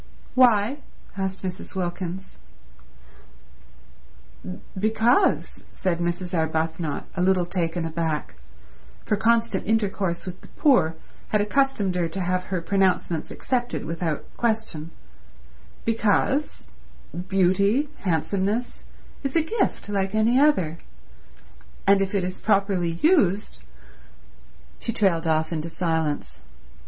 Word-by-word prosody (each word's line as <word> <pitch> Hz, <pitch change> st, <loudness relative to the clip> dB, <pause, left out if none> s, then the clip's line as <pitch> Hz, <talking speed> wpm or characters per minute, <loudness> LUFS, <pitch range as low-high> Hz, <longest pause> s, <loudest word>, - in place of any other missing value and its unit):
"Why?" 245 Hz, +1 st, +4 dB, 0.4 s
asked 190 Hz, -1 st, -3 dB
Mrs. 185 Hz, +1 st, -5 dB
Wilkins. 180 Hz, 0 st, -4 dB, 2.4 s
"Because," 220 Hz, -, +2 dB
said 175 Hz, -3 st, -1 dB
Mrs. 175 Hz, +1 st, -2 dB
Arbuthnot, 160 Hz, -1 st, -1 dB
a 180 Hz, -, -1 dB
little 185 Hz, -1 st, +3 dB
taken 170 Hz, -1 st, -1 dB
aback, 160 Hz, -2 st, -2 dB, 0.7 s
for 210 Hz, -, +2 dB
constant 225 Hz, -2 st, +1 dB
intercourse 200 Hz, -5 st, 0 dB
with 185 Hz, -1 st, -7 dB
the -, -, -14 dB
poor 180 Hz, -, +3 dB, 0.3 s
had 210 Hz, -, +1 dB
accustomed 210 Hz, -3 st, +1 dB
her 175 Hz, -2 st, 0 dB
to 165 Hz, +4 st, -5 dB
have 185 Hz, 0 st, 0 dB
her 185 Hz, -2 st, -2 dB
pronouncements 185 Hz, -3 st, +1 dB
accepted 245 Hz, -7 st, -2 dB
without 165 Hz, -1 st, -2 dB
question, 220 Hz, -9 st, -1 dB, 1.0 s
"because 225 Hz, +6 st, +1 dB, 0.6 s
beauty—handsomeness— 200 Hz, -, +1 dB, 0.4 s
is 275 Hz, -2 st, -3 dB
a 325 Hz, -, +4 dB
gift 395 Hz, -, -1 dB
like 195 Hz, -1 st, -1 dB
any 230 Hz, +4 st, +4 dB
other, 185 Hz, -, +3 dB, 1.1 s
and 195 Hz, 0 st, +5 dB
if 195 Hz, +1 st, -1 dB
it 195 Hz, -, +1 dB
is 185 Hz, +1 st, -4 dB
properly 195 Hz, -4 st, +2 dB
used—" 205 Hz, -, +3 dB, 1.2 s
She -, -, -2 dB
trailed 175 Hz, -6 st, +2 dB
off 160 Hz, +1 st, +1 dB
into 160 Hz, +1 st, -3 dB
silence. 160 Hz, -, -2 dB
190 Hz, 105 wpm, -24 LUFS, 170-220 Hz, 2.4 s, and